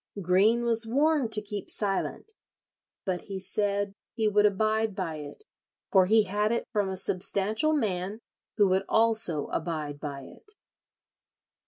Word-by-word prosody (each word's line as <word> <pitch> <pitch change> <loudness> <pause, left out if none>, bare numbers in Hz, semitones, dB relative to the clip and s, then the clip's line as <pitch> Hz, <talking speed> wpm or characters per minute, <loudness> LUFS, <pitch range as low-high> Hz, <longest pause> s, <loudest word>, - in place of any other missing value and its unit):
Greene 200 +6 +3
was 230 -1 +3
warned 280 0 +1
to 210 - +2
keep 205 -1 -6
silent, 205 - -2 0.7
but 185 -3 -2
he 195 -1 -6
said 200 +1 -1 0.2
"he 220 -2 +1
would 210 0 +4
abide 215 +1 0
by 165 -5 -4
it, 150 - -10 0.5
for 190 -2 +5
he 220 +2 +4
had 210 +2 -1
it 235 - -1
from 205 -3 0
a 190 - -4
substantial 200 - +1
man 200 -3 -2 0.4
who 205 -2 +5
would 190 +1 +1
also 220 -9 +3
abide 155 -3 -4
by 140 -2 -6
it." 420 - -15
205 Hz, 145 wpm, -27 LUFS, 185-220 Hz, 0.7 s, for